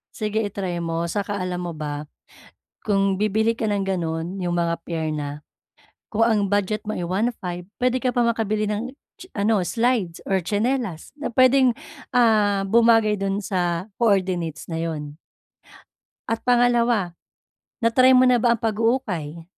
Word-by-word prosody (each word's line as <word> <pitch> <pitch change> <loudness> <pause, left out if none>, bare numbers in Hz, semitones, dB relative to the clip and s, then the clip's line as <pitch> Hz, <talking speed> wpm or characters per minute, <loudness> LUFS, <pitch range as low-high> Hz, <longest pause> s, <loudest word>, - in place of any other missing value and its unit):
Sige 215 0 -1
i-try 185 -3 -4
mo, 165 0 -2
saka 205 +3 -2
alam 180 -1 -3
mo 170 - -5
ba, 150 -1 -5 0.8
kung 195 -2 +2
bibili 220 +3 +1
ka 225 - -2
ng 205 -2 0
gano'n, 165 -4 -2 0.2
'yong 175 -1 -1
mga 170 -1 +1
pair 160 -2 -2
na, 145 -1 -5 0.7
kung 220 - 0
ang 220 -3 +2
budget 205 +1 0
mo 215 - -3
ay 180 - -3
1,500 180 -2 -2 0.2
puwede 250 0 +2
ka 250 0 -1
pa 245 - +2
makabili 215 -2 0
ng 225 +5 -3 0.2
tsi 370 - -12
ano, 210 +1 +2
slides 225 -5 0
or 195 - +3
tsinelas 210 -1 -2
na 290 -5 -5
puwedeng, 255 0 +5 0.4
ah, 215 -5 +3
bumagay 225 -1 +4
do'n 195 +1 -1
sa 180 -1 -2
coordinates 185 -8 0
na 165 - -3
'yon. 155 -3 -4 1.1
At 225 0 -2
pangalawa, 240 -6 +2 0.7
na-try 255 +3 +5
mo 255 - +6
na 250 -1 +4
ba 235 0 +3
ang - - -23
pag-uukay? 210 - -1
205 Hz, 150 wpm, -23 LUFS, 175-230 Hz, 1.1 s, mo